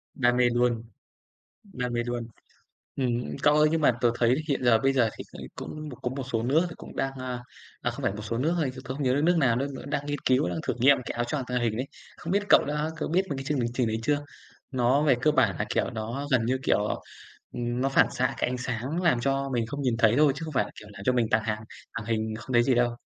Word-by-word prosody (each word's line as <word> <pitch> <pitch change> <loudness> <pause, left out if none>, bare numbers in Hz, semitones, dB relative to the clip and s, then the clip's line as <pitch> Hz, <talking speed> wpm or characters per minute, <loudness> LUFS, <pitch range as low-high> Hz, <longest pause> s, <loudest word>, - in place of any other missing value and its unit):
Đam 125 -1 +2
mê 125 -1 +4
luôn, 120 -1 +1 0.8
đam 125 - -5
mê 120 0 0
luôn. 120 -1 -3 0.7
Ừm, 125 -3 -1
cậu 145 0 +5
ơi, 150 0 +5
nhưng 165 0 +1
mà 150 - +5
tớ 120 - +4
thấy 120 +1 +3
hiện 140 -4 -1
giờ 120 -2 +5
bây 135 +3 +2
giờ 120 -4 +3
thì - - -6 0.3
cũng 155 0 -7
cũng 125 - -10
có 125 - -1
một 135 +1 -4
số 115 -1 0
nước 150 +8 +3
thì 170 - -9
cũng - - -11
đang, 135 - -1
à 125 -1 -4 0.4
à, - - 0
không - - -8
phải - - +1
một 105 - -6
số 110 +2 -3
nước 155 +7 +1
thôi 150 -6 0
chứ 130 - -8
tớ 130 0 -5
không 140 +2 -4
nhớ 130 -1 +2
được 145 - +1
nước 175 +3 +3
nào, 130 -7 +3
nước 135 +4 0
đó - - -7
đang 145 0 -2
nghiên 145 -1 -2
cứu, 130 +4 +2
đang - - -3
thử - - +1
nghiệm 135 +3 +6
cái - - -3
áo 120 - 0
choàng 135 +3 -2
tàng 125 -1 -1
hình 110 -2 0
đấy. 130 +3 -2 0.3
Không 165 - -5
biết 200 +2 +2
cậu - - +7
đã 150 +1 -1
cậu - - -3
biết 185 +4 +2
mấy 140 - -2
cái 135 - -4
chương 145 -1 0
hình 120 -1 -1
trình 125 -1 +1
đấy 110 0 -1
chưa? 145 +4 +2 0.5
Nó 130 +2 +2
về 140 -4 +4
cơ 155 - +4
bản 125 - +3
là, - - 0
kiểu, - - 0
nó 120 +5 -4
gần 125 -3 +3
như 130 +3 +1
kiểu - - +3
nó, - - -1 0.6
ừm, 120 0 -2
nó 135 - +2
phản 135 - +4
xạ 130 -1 0
cái - - 0
ánh 125 - -2
sáng 125 +6 -3
làm 170 -9 +3
cho 135 +2 0
mình 120 -2 +1
không 145 +4 -5
nhìn 125 -4 +1
thấy 115 0 +4
thôi, 150 -2 +5
chứ 145 - -8
không 155 - -6
phải 125 - +3
là, - - -11
kiểu, 105 - -13
làm 100 - -9
cho 130 - +2
mình 120 -2 +2
tàng 110 0 +3
hàng 110 0 -2 0.3
tàng 115 -2 -5
hình 110 -1 -1
không 115 +4 -7
thấy 120 0 +5
gì 130 - +3
đâu. 120 0 +2
125 Hz, 285 wpm, -27 LUFS, 120-140 Hz, 0.8 s, cậu